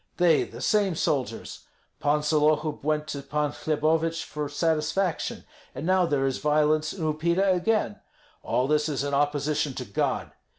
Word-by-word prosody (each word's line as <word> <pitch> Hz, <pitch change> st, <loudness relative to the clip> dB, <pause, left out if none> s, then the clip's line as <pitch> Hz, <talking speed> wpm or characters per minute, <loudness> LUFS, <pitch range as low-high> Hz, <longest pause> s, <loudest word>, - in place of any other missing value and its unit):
They, 175 Hz, -4 st, +4 dB
the -, -, -10 dB
same 200 Hz, -5 st, +2 dB
soldiers. 140 Hz, -4 st, -2 dB, 0.3 s
Pan 150 Hz, +1 st, +1 dB
Sollohub 150 Hz, 0 st, +1 dB
went 150 Hz, 0 st, 0 dB
to 140 Hz, -, -4 dB
Pan 145 Hz, +1 st, -1 dB
Hlebovich 160 Hz, +2 st, 0 dB
for 150 Hz, -1 st, -5 dB
satisfaction, 160 Hz, +4 st, -1 dB, 0.3 s
and -, -, -5 dB
now 185 Hz, 0 st, +3 dB
there 140 Hz, -3 st, +1 dB
is 135 Hz, -1 st, -1 dB
violence 150 Hz, +1 st, +2 dB
in 180 Hz, -, -6 dB
Upita 170 Hz, +5 st, +2 dB
again. 180 Hz, -, 0 dB, 0.4 s
All 125 Hz, -, 0 dB
this 150 Hz, +1 st, +1 dB
is 140 Hz, -2 st, -1 dB
in 140 Hz, 0 st, -3 dB
opposition 145 Hz, 0 st, 0 dB
to -, -, -5 dB
God. -, -, -1 dB
150 Hz, 155 wpm, -26 LUFS, 145-165 Hz, 0.4 s, They